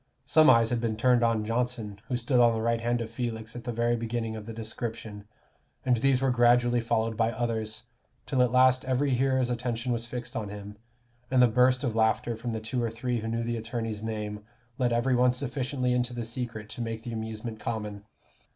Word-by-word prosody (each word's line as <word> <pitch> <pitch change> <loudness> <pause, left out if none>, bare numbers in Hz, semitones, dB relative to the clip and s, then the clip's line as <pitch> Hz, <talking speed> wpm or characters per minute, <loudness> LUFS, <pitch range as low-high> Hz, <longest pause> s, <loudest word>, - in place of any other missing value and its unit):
Some 155 +3 +6
eyes 115 -2 +5
had 120 -1 0
been 115 -2 -1
turned 125 +1 +4
on 115 -2 +2
Johnson, 115 -3 -2
who 125 -3 -1
stood 120 +1 +1
on 120 -1 +5
the 110 - -2
right 115 0 +1
hand 120 0 0
of 115 -1 -5
Felix, 115 -2 -4
at 120 - -8
the 120 - -2
very 120 +1 +1
beginning 115 -1 -3
of 110 0 -8
the - - -5
description, 110 -2 -6 0.6
and 125 -2 +3
these 135 +2 +2
were 135 - +3
gradually 120 0 +4
followed 115 -1 0
by 115 +1 +1
others, 110 -2 -3 0.4
till 130 - +1
at 125 - +4
last 130 0 +5
every 130 +2 +1
hearer's 130 0 +2
attention 120 0 -2
was 115 0 -3
fixed 120 0 -6
on 105 -3 -3
him, 105 0 -8 0.5
and 130 - +2
the 125 - +8
first 115 - -1
burst 125 +2 +4
of 120 -5 -1
laughter 110 +1 +2
from 115 +2 -4
the 110 - -2
two 120 +3 -2
or 115 - 0
three 120 +1 -2
who 110 - -5
knew 115 +1 -1
the 120 0 -2
attorney's 115 -1 -4
name, 105 -1 -4 0.4
let 125 -2 +2
every 120 +3 +2
one 125 0 +4
sufficiently 130 0 -1
into 125 0 0
the 120 -1 -3
secret 115 -2 -5
to 120 - -6
make 115 -1 -4
the 120 - -5
amusement 110 0 -5
common. 105 -3 -4
115 Hz, 215 wpm, -28 LUFS, 110-125 Hz, 0.6 s, the